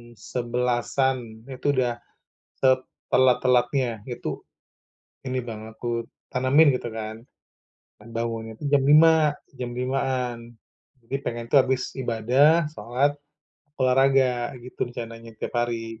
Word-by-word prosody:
11.00-an, 120 -1 -1
itu 140 +2 -1
udah 120 -2 0 0.6
setelat-telatnya, 125 -2 +2
itu 120 -1 -5 0.9
ini 130 0 -2
Bang, 110 -2 -7
aku 115 -1 -3 0.2
tanamin 135 +4 +5
gitu - - -7
kan. 110 0 -6 0.8
Dan 105 - -15
bangunnya 115 -1 -3
tuh 145 - -3
jam 140 -1 +3
lima 155 +1 +6 0.2
jam 125 -1 -5
limaan. 125 -2 -1 0.7
Jadi, 135 - -2
pengen 120 0 -4
tuh - - +5
habis 130 -1 -2
ibadah, 130 +7 +3
sholat, 135 +2 0 0.6
olahraga, 130 -1 +3
gitu 125 - -4
rencananya 115 -1 -8
tiap - - -5
hari. 115 -1 -2
125 Hz, 110 wpm, -25 LUFS, 115-135 Hz, 0.9 s, lima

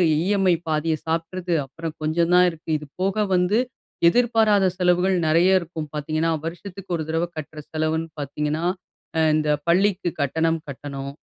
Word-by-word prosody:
EMI. 185 +1 +2
பாதிய 155 +1 +1
சாப்ட்டுறுது. 170 +2 -2
அப்பறம் 160 +3 -7
கொஞ்சம் 165 +2 +1
தான் 180 0 +7
இருக்கு. 165 0 -13
இது 150 -1 -10
போக 195 +3 +1
வந்து 180 +4 +2 0.5
எதிர்பாராத 220 -3 +3
செலவுகள் 180 +1 +3
நெறைய 180 +4 +4
இருக்கும் 160 -3 -6
பார்த்தீங்கன்னா, 155 +2 0
வருஷத்துக்கு 180 +2 -6
ஒரு 160 - -3
தடவ 165 +1 0
கட்டுற 155 0 -7
செலவுன்னு 160 +1 -1
பார்த்தீங்கன்னா, 150 +2 -2 0.5
அ - - +3 0.2
இந்த 155 -1 0 0.2
பள்ளிக்கு 180 0 +2
கட்டணம் 160 +3 0
கட்டணும். 140 0 -6
165 Hz, 140 wpm, -23 LUFS, 155-185 Hz, 0.5 s, தான்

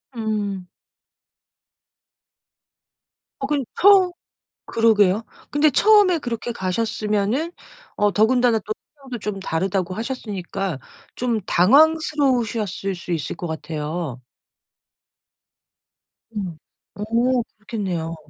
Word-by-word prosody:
음. 205 -5 -3 2.7
어 - - 0
그럼 285 -2 0 0.2
처음 385 -2 +6 0.6
그러게요. 220 -3 +3 0.3
근데 295 +1 +4
처음에 410 0 +5
그렇게 240 -3 -4
가셨으면은 215 - -1 0.4
어 205 -1 +2
더군다나 235 +1 +3
또 215 +1 -5 0.2
성향도 260 -4 -7
좀 210 -1 -4
다르다고 185 +1 -1
하셨으니까 195 - -4 0.4
좀 235 -3 -1
당황스러우셨을 245 - +2
수 175 0 -6
있을 160 +1 -3
것 175 - -5
같아요. 155 -3 -4 2.2
음. 185 -6 -4 0.4
어. 205 - -5 0.5
그렇겠네요. 185 -7 -4
215 Hz, 210 characters per minute, -22 LUFS, 185-250 Hz, 2.7 s, 처음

